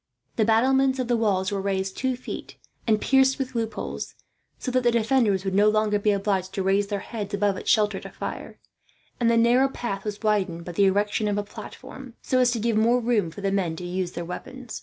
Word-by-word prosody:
The 220 - +2
battlements 260 +4 +3
of 255 -2 -2
the 240 - +2
wall 205 -5 +1
were 200 -1 -1
raised 190 -1 -2
two 260 -1 -1
feet 255 - -8 0.3
and 215 -1 +3
pierced 265 +1 +3
with 265 -1 -4
loopholes, 225 -2 -4 0.4
so 255 - -4
that 255 0 +2
the 240 - +3
defenders 225 -4 +2
would 190 - -1
no 205 +2 +5
longer 215 -1 +1
be 210 - +1
obliged 195 -2 0
to 195 - -1
raise 195 +1 +2
their 200 -1 -3
heads 205 -2 -5
above 200 -1 +1
its - - -5
shelter 210 -2 +3
to - - -9
fire; - - -7 0.6
and 235 -2 +3
the 230 - +3
narrow 240 +3 +4
path 200 -7 -4
was 210 -1 -4
widened 190 -6 0
by 175 - -5
the 195 +4 +3
erection 205 +2 +1
of 205 -1 0
a 205 - 0
platform, 235 +4 -10
so 255 - +1
as 250 -1 +4
to 235 -1 -1
give 225 0 +1
more 235 +3 +4
room 225 -7 +1
for 180 +5 -10
the 195 0 0
men 185 -5 0
to 180 - -8
use 180 0 -3
their 170 0 -5
weapons. 240 +7 -7
210 Hz, 225 wpm, -25 LUFS, 195-240 Hz, 0.6 s, no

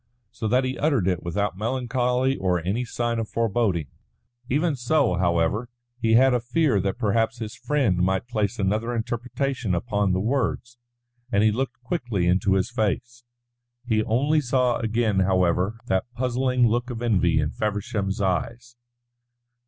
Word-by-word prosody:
So 110 -1 -4
that 125 +4 +2
he 130 +1 -3
uttered 140 - +1
it 90 -3 0
without 100 +3 -2
melancholy 125 +2 0
or 90 -5 0
any 100 +9 -2
sign 120 0 -2
of 110 - -3
foreboding. 110 -7 0 0.6
Even 150 +3 +1
so, 135 -2 +1
however, 85 +6 0 0.3
he 110 -1 +2
had 130 +3 +6
a 125 - +2
fear 125 -1 +1
that 95 +3 -2
perhaps 115 0 +1
his 110 -2 -6
friend 135 - 0
might 95 +4 0
place 105 -5 -1
another 110 +4 0
interpretation 120 -1 -2
upon 100 +1 0
the 90 - +1
words, 120 +1 -2 0.5
and 100 -2 +3
he 110 - +4
looked 130 +3 -3
quickly 120 - -1
into 95 +2 +2
his 95 +5 0
face. 120 +1 -2 0.6
He 110 -3 +1
only 145 +7 +2
saw 125 -2 +1
again, 110 -3 0
however, 95 +2 +1
that 95 +6 -1
puzzling 125 0 +1
look 120 +3 0
of 120 -1 -5
envy 90 -8 +2
in 75 0 0
Feversham's 105 -2 -2
eyes. 115 +6 -2
115 Hz, 150 wpm, -24 LUFS, 95-125 Hz, 0.6 s, had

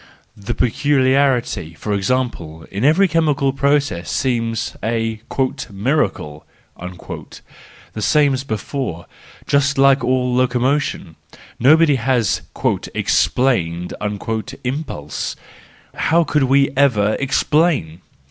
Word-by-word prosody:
The 105 +4 -5
peculiarity, 130 - +1
for 105 +6 -4
example, 95 -7 -2
in 100 - -3
every 160 +8 +4
chemical 150 -5 +1
process 140 - 0
seems 115 - -1
a 115 -1 -2 0.2
" 130 - -4
miracle," 100 - -1 0.4
the 90 +4 -11
same 145 +4 +3
as 130 +1 -2
before, 110 - -4 0.4
just 140 0 +1
like 135 -1 +4
all 125 0 +1
locomotion; 125 - 0 0.4
nobody 150 +3 +5
has 120 -4 +1 0.3
" - - -6
explained 90 -10 +1 0.3
" 115 +3 -4
impulse. 125 - -4 0.6
How 170 +1 +2
could 150 -3 +1
we 135 +1 +3
ever 110 -7 +3
explain! 140 - +1
125 Hz, 100 wpm, -19 LUFS, 105-140 Hz, 0.6 s, nobody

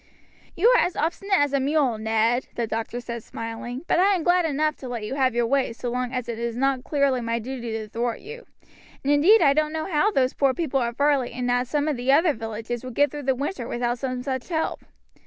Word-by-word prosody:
"You 385 +7 +3
are - - +5
as 355 - -2
obstinate 385 +5 0
as 290 -1 +1
a 280 - +3
mule, 270 -4 +1
Ned," 225 +3 +1
the 235 - -1
doctor 225 +2 -3
said, 235 -1 -6
smiling; 230 +4 -6
"but - - +2
I 390 +2 +4
am 345 - -2
glad 350 0 +3
enough 305 0 0
to 260 - -8
let 240 -3 -4
you 210 - -4
have 260 -3 +1
your 240 0 +2
way 265 -1 +1
so 240 +1 -5
long 250 0 -2
as 250 -2 -3
it 230 -1 -4
is 235 0 -3
not 270 -1 +1
clearly 280 -4 +1
my 230 0 -1
duty 240 0 -5
to 220 -1 -4
thwart 235 +2 -2
you; 470 +3 -10 0.6
and 280 +2 +2
indeed 345 +9 +6
I 280 -2 +5
don't 305 +1 +1
know 315 0 -3
how 355 +3 +2
those 265 -10 +1
poor 275 -2 +2
people 285 -6 0
at 235 0 -2
Varley 285 -3 +2
and 245 0 -1
at 245 0 +1
some 295 +3 0
of 300 -4 0
the 250 +2 +1
other 315 +3 +4
villages 225 +1 -5
would 255 -2 -7
get 290 0 +3
through 295 - -6
the 265 - +3
winter 270 -2 -4
without 240 0 -2
some 255 -1 -3
such 260 +1 -4
help." 320 -2 -2
260 Hz, 245 wpm, -24 LUFS, 240-295 Hz, 0.6 s, indeed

